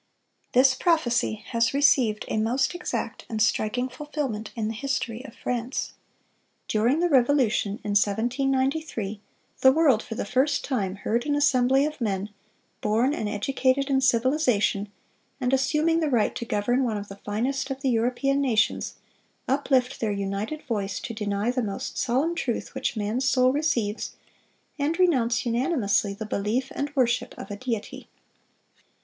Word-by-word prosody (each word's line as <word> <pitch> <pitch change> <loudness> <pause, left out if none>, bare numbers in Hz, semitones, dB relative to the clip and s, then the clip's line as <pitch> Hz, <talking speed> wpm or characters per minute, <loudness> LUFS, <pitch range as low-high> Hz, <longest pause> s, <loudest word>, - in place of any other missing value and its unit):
This 260 +1 +6
prophecy 250 - +1
has 230 +1 +1
received 255 -6 +3
a - - -2
most 250 +7 +1
exact 350 0 -4
and 220 - -3
striking 220 +3 +1
fulfilment 260 -5 -4
in 220 -2 -2
the 220 - -2
history 245 -1 -3
of 230 - -11
France. 245 +1 -3 0.7
During 240 +9 +2
the 350 - +3
Revolution, 250 - +3
in 205 - -3
1793, 245 +2 0 0.4
"the 265 - +7
world 275 -6 +4
for 225 - -7
the - - -3
first 260 +4 +1
time 200 -9 -1
heard 230 +5 -1
an 290 - +1
assembly 270 -1 +3
of 305 -3 -5
men, 200 -2 -2 0.5
born 225 +6 +2
and 215 -7 -2
educated 265 +6 0
in 265 -1 +3
civilization, 240 -5 +2 0.5
and 255 -1 0
assuming 305 +5 +2
the 315 -2 0
right 240 -5 +2
to 235 - -5
govern 245 +5 +1
one 225 -4 -1
of 205 0 -6
the 195 - -10
finest 240 +8 -2
of 270 0 -4
the 270 - +1
European 250 +4 +1
nations, 235 -5 +1 0.5
uplift 265 -1 +1
their 220 -2 0
united 200 +8 -3
voice 205 -5 -2
to 230 - -6
deny 210 +1 -1
the 250 0 -1
most 200 -4 -4
solemn 265 +7 +1
truth 245 -8 -3
which - - -2
man's 225 +5 0
soul 255 0 +3
receives, 235 -8 -1 0.7
and 300 +4 0
renounce 255 -11 +2
unanimously 235 - +1
the 220 - -6
belief 215 +5 -1
and 285 +1 -3
worship 250 -2 +1
of - - -8
a - - -3
Deity." 225 0 -5
245 Hz, 155 wpm, -26 LUFS, 215-275 Hz, 0.7 s, the